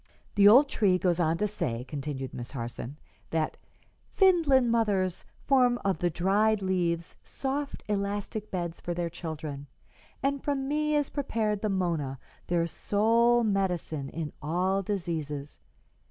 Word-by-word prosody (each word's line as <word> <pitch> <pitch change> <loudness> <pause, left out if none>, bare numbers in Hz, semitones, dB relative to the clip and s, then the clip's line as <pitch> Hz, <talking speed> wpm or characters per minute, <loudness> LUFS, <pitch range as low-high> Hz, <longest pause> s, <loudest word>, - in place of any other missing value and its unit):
"The 200 -1 +6
old 260 +8 +8
tree 200 -8 +2
goes 180 -1 +1
on 165 -1 +2
to 210 - +1
say," 125 - -3
continued 135 -1 -5
Miss 120 0 -6
Harson, 120 +2 -6 0.3
"that 160 -1 -1 0.6
'Finland 310 - +4
mothers 200 -6 +1 0.2
form 250 -3 +4
of 195 -2 +1
the 175 - +2
dried 200 +5 +2
leaves 175 -3 -1
soft, 275 +1 -4
elastic 205 +1 -2
beds 175 -2 -4
for 175 - -3
their 170 -1 -2
children, 155 -4 -6 0.6
and 280 0 0
from 275 -2 -1
me 300 +1 +1
is 290 -2 +1
prepared 220 -7 -1
the 215 - 0
mona, 165 -8 -1 0.3
their 170 -1 +1
sole 230 +6 +3
medicine 180 -9 -1
in 155 -1 -5
all 180 +6 +1
diseases. 160 -7 -4
190 Hz, 140 wpm, -28 LUFS, 165-225 Hz, 0.6 s, old